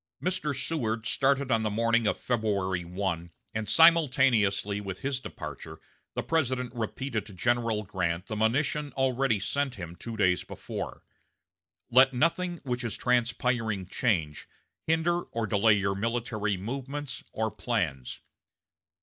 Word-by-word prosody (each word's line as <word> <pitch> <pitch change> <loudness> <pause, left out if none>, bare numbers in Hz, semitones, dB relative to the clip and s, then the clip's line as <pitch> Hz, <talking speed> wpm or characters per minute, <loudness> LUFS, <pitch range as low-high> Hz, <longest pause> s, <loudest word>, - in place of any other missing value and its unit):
Mr. 180 -4 -1
Seward 115 -7 -1
started 135 0 +2
on 115 -1 +3
the 110 - 0
morning 115 +1 +2
of - - 0
February 100 -6 0
1, 85 -1 -3 0.2
and 110 -1 -3
simultaneously 130 - +4
with 95 -2 -6
his 135 -1 -1
departure - - -8 0.4
the - - -1
President 130 -6 0
repeated 115 0 -3
to 105 -1 -12
General 115 +1 +1
Grant 90 -3 -2
the 110 - -5
monition 140 +7 +1
already 130 -3 +2
sent 140 +5 -1
him 85 -4 -7
two 115 +4 -7
days 90 -4 +3
before: - - -6 0.9
"Let 130 +1 +6
nothing 170 +5 +1
which 125 -2 -2
is 115 -4 -3
transpiring 120 -4 +1
change, 85 - -1 0.4
hinder, 165 +2 +2
or 115 -8 -3
delay 105 +1 +4
your 100 -1 +1
military 110 -1 -1
movements 135 +7 -5
or 110 0 -1
plans." 85 - -2
115 Hz, 130 wpm, -28 LUFS, 100-135 Hz, 0.9 s, Let